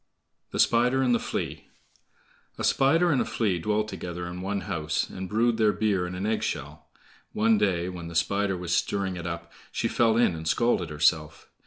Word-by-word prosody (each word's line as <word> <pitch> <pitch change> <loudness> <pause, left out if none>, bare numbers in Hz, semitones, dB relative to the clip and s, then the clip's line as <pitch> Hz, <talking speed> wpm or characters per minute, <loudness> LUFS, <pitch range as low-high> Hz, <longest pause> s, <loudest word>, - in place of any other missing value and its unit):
The - - -5
Spider 125 +3 +3
and 125 -2 +3
the 120 - +3
Flea - - -4 0.9
A - - -4
spider 165 +6 +3
and 135 - +2
a - - +2
Flea 100 -6 0
dwelt 105 +4 0
together 90 -3 -6
in 90 +1 -6
one 100 +1 -2
house, 75 -2 -2
and 95 0 -7
brewed 115 +2 +2
their 110 -2 +4
beer 100 -4 0
in 90 - -6
an 95 +2 -3
egg 110 0 0
shell. - - -5 0.5
One 110 0 +3
day, 90 -4 +1
when 90 -2 -6
the 85 - -8
Spider 100 +2 +1
was 90 -1 -3
stirring 95 -2 -1
it 90 0 -5
up, 85 0 -6 0.2
she - - -1
fell 115 -1 +2
in 120 -7 +3
and 80 0 -6
scalded 95 -3 +1
herself. 75 -1 0
95 Hz, 195 wpm, -27 LUFS, 85-110 Hz, 0.9 s, their